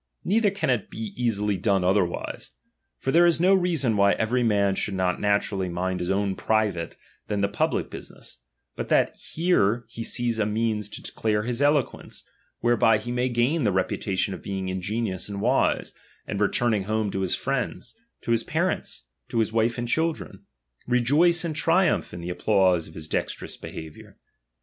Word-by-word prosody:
Neither 210 +3 +3
can 195 -8 -1
it 120 -5 0
easily 105 -2 -1
be - - -12
done 100 -2 +2
otherwise. 90 -8 -1 0.4
For 135 - -2
there 175 +3 +6
is 170 -2 +3
no 185 +3 +5
rea 180 -2 +2
son 125 -7 +1
why 100 0 +4
every 120 +3 0
man 100 -4 +2
should 95 +1 -2
not 90 -1 0
naturally 100 -2 0
mind 90 +1 -2
his 90 - -3
own 100 0 +1
private, 105 -7 0 0.3
than 105 -1 -1
the 100 - +3
public 100 - -1
business, - - -9 0.4
but - - -5
that - - +3 0.2
here 120 - +2
he 115 0 -6
sees 120 -1 0
a 105 - +2
means 110 -1 -1
to - - -8
declare 105 -1 -1
his 120 +3 -2
eloquence, 145 -2 0 0.4
whereby 120 -2 +4
he 120 +3 -6
may 125 +1 0
gain 125 +7 +1
the 105 -6 +2
reputation 95 +1 -1
of - - -8
being 95 -1 -4
in 95 0 -3
genious 105 -1 -2
and 100 -1 -5
wise, - - +1 0.3
and 100 - -4
returning 105 -1 +1
home 110 -1 -1
to 95 - -3
his 95 -2 +1
friends, 135 -2 -3 0.3
to - - -3
his 115 -1 +2
parents, - - -2 0.3
to - - -3
his 110 -1 +1
wife 115 +1 +1
and 120 0 -3
children, 160 +5 -2 0.4
rejoice 150 +8 +3
and 160 -2 -3
triumph 170 +3 +2
in 85 - -7
the 85 - -5
applause 95 -3 +2
of 80 - -15
his 80 -1 -6
dexte - - -2
rous - - -8
behaviour. 80 -1 -10
110 Hz, 185 wpm, -25 LUFS, 95-125 Hz, 0.4 s, there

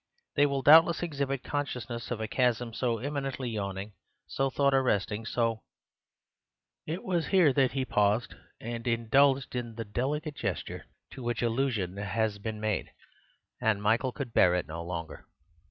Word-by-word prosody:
They 145 0 +5
will 140 -1 -2
doubtless 165 +3 +7
exhibit 140 -5 -2
consciousness 125 -5 -4
of 120 - -3
a 110 - -2
chasm 120 -1 0
so 120 -1 0
eminently 135 -1 -3
yawning, 100 -1 -4 0.3
so 135 0 -1
thought 140 +1 +2
arresting, 110 -4 +1
so—" 115 -2 0 1.3
It 165 +4 -4
was 175 -4 0
here 180 -8 +4
that 130 -1 +2
he 135 -1 -1
paused 105 0 +1 0.3
and 115 +1 -5
indulged 130 +4 +3
in 120 -2 -4
the 115 0 -5
delicate 145 +8 -2
gesture 100 - -4 0.2
to 135 - -9
which 120 0 -2
allusion 115 -6 0
has 105 +1 -1
been 110 +1 -5
made; 110 -2 -1 0.7
and 110 -2 +2
Michael 115 +5 +1
could 125 -3 -6
bear 90 -1 +5
it 90 - -1
no 85 +2 -6
longer. 85 -2 -6
120 Hz, 155 wpm, -29 LUFS, 110-135 Hz, 1.3 s, doubtless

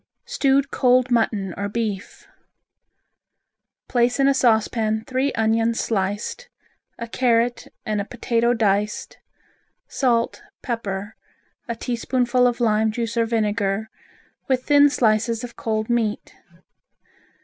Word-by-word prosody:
Stewed 280 - +1
Cold 255 -1 +3
Mutton 210 -5 0
or 200 0 -3
Beef 215 -2 -4 1.6
Place 245 +1 +1
in 275 - +4
a 275 - +4
saucepan 220 -3 +1
three 265 +2 0
onions 225 +1 +1
sliced, 210 - -2 0.5
a 235 - -6
carrot 240 0 +1 0.2
and 210 -1 -1
a - - -5
potato 235 +1 0
diced; 210 -1 -1 0.7
salt, 240 - 0 0.2
pepper, 210 -4 -4 0.5
a 235 - -3
teaspoonful 245 +1 +1
of 245 0 -1
lime 220 -2 +2
juice 230 +1 -3
or 230 -1 +1
vinegar, 215 -1 -1 0.6
with 255 -1 +1
thin 290 0 +5
slices 230 -2 +1
of 240 -1 -8
cold 220 -1 -2
meat. 230 -3 -1
230 Hz, 115 wpm, -22 LUFS, 215-245 Hz, 1.6 s, thin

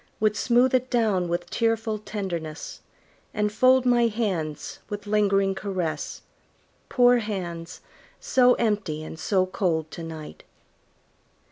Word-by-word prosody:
Would 215 -1 +2
smooth 245 +4 +3
it 255 0 +1
down 215 -7 +1
with 175 +1 -2
tearful 225 -2 0
tenderness, 175 -7 -5 0.6
And 210 0 +1
fold 255 +3 +4
my 240 -1 +4
hands 190 -10 -3
with 205 -1 -5
lingering 200 -2 +2
caress 190 -4 -4 0.7
Poor 245 -1 +5
hands, 180 -6 -5 0.4
so 250 -1 +4
empty 205 -9 -1
and 160 0 -8
so 185 0 +2
cold 165 -4 -1
to 170 - -7
night! 160 -2 -8
205 Hz, 120 wpm, -25 LUFS, 175-230 Hz, 0.7 s, Poor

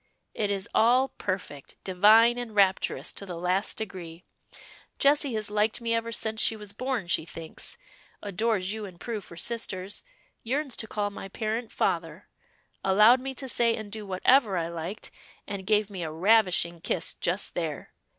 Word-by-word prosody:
"It 210 -2 -1
is 200 +1 -2
all 250 +4 +4
perfect, 185 -8 -5
divine, 220 +6 +5
and 230 -3 -6
rapturous, 195 -2 +2
to - - -7
the 185 -3 -6
last 180 +3 0
degree. 180 -5 -6 0.7
Jessie 280 -3 +3
has 215 -1 -3
liked 210 +1 +1
me 230 -1 -1
ever 230 0 -1
since 220 0 0
she 225 - +4
was 210 -2 -8
born, 255 -2 -2
she 175 - +1
thinks; 165 0 -7 0.5
adores 205 -1 0
you 220 -1 -5
and 180 -3 -11
Prue 230 -3 -4
for 170 -2 -13
sisters; 200 -2 -2 0.4
yearns 270 +2 -1
to 220 - -2
call 205 -1 -2
my 200 - -7
parent 220 +3 -3
father; 165 +2 -1 0.6
allowed 210 +6 +6
me 265 0 -5
to 265 - -3
say 235 -2 +2
and 215 -2 -7
do 215 0 -5
whatever 200 +2 +3
I 165 -1 -1
liked; 170 +5 -6 0.4
and 195 -2 -6
gave 210 -1 +3
me 190 -3 -5
a 160 -2 -3
ravishing 180 -2 +3
kiss 175 - 0
just 180 +3 -1
there. 160 -4 -4
205 Hz, 170 wpm, -27 LUFS, 185-230 Hz, 0.7 s, allowed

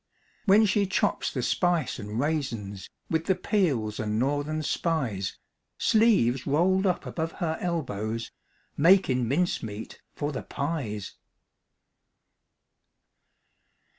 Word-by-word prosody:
When 210 +2 +6
she 200 0 +2
chops 190 - 0
the - - -2
spice 175 -5 +1
an' 105 +1 -5
raisins, 120 -9 -2 0.2
With 160 0 +1
the 190 - +2
peels 145 - 0
an' 105 -1 -1
Northern 145 +5 0
Spies, 130 - -1 0.4
Sleeves 195 - +3
rolled 185 +7 +3
up 180 - 0
above 165 0 -3
her 160 -2 -2
elbows, 115 - -2 0.4
Makin' 145 -7 +4
mincemeat 115 -8 -2
for 145 0 -2
the 130 - -4
pies. 135 - -4
145 Hz, 105 wpm, -27 LUFS, 115-175 Hz, 0.4 s, When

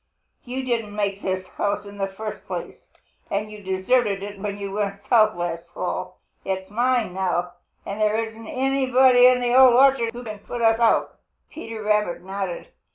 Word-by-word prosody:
You 260 +2 -4
didn't 230 -5 -2
make 200 -1 -2
this 185 -1 -3
house 205 0 -2
in 200 0 -11
the 195 - 0
first 215 +3 -7
place, - - -7 0.4
and 210 +2 -2
you 210 -1 -10
deserted 195 +2 +1
it 205 0 -7
when 200 0 -4
you 200 -1 -5
went 200 0 -3
south 215 -3 +4
last 170 -1 -4
fall. - - -4 0.3
It's 190 0 -4
mine 240 -3 +1
now, 180 -1 -1 0.3
and 200 +2 -5
there 215 0 +2
isn't 225 0 -5
anybody 260 -1 +4
in 250 0 +4
the 240 0 +1
Old 260 -2 +8
Orchard 260 -3 +4
who 240 +1 -8
can 215 -3 -7
put 240 - -7
me - - +3
out." 225 0 +2 0.3
Peter 225 -8 -7
Rabbit 210 -5 0
nodded. 190 -2 -5
210 Hz, 175 wpm, -23 LUFS, 195-240 Hz, 0.4 s, Old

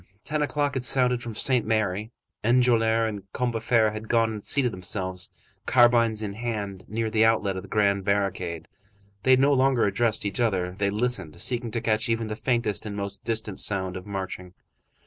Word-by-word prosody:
Ten 150 0 -2
o'clock 145 -1 0
had 130 - -2
sounded 125 -1 +3
from 115 -2 -6
Saint 125 +1 +3
Merry. 110 -1 -1 0.3
Enjolras 115 -1 +3
and 100 -3 -7
Combeferre 115 -2 +1
had 110 +1 -8
gone 115 -1 +2
and 105 -2 -7
seated 130 -5 +2
themselves, 95 0 -5 0.4
carbines 115 -3 +4
in 100 -2 -4
hand, 105 -4 -4
near 110 +1 -2
the 110 0 +3
outlet 110 -3 +2
of 95 - -4
the - - -13
grand 100 -2 +2
barricade. 95 -4 -1 0.5
They 130 0 +5
no 140 +2 +3
longer 130 -2 +3
addressed 110 +2 +1
each 100 +2 -2
other, 95 -6 0
they 100 +2 -1
listened, 100 -7 -2
seeking 120 +4 -1
to 115 +1 -3
catch 110 +1 0
even 115 0 0
the 110 - -3
faintest 115 -4 -1
and 100 - -5
most 100 0 -4
distant 110 -4 -2
sound 95 -2 -1
of 95 +2 -8
marching. 95 -2 -6
110 Hz, 180 wpm, -25 LUFS, 100-120 Hz, 0.5 s, They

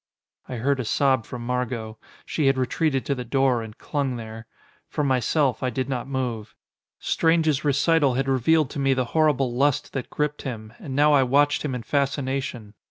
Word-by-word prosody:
I 125 - -4
heard 135 +4 0
a - - -1
sob 130 0 +1
from 120 -1 -7
Margot. 120 -3 -3 0.3
She 150 -4 0
had 135 0 +3
retreated 135 +2 0
to 140 - 0
the 125 -2 -4
door, 130 -1 +1
and 110 0 -9
clung 140 -3 -2
there. 110 -1 -8 0.4
For 150 - -2
myself, 135 +1 +1
I 130 - 0
did 130 +1 -2
not 125 -1 -3
move. 120 -6 -4 0.4
Strange's 160 -3 +1
recital 145 -1 +3
had 135 +1 0
revealed 135 +3 +2
to - - -5
me 135 -1 +2
the 130 -1 0
horrible 145 -6 +2
lust 140 +2 +1
that 135 - -4
gripped 150 0 -2
him, 110 -5 -6
and 130 - -6
now 150 +1 +5
I 140 - +6
watched 145 +3 +3
him 140 -4 -2
in 120 - -5
fascination. 135 -5 -2
130 Hz, 185 wpm, -24 LUFS, 125-145 Hz, 0.4 s, I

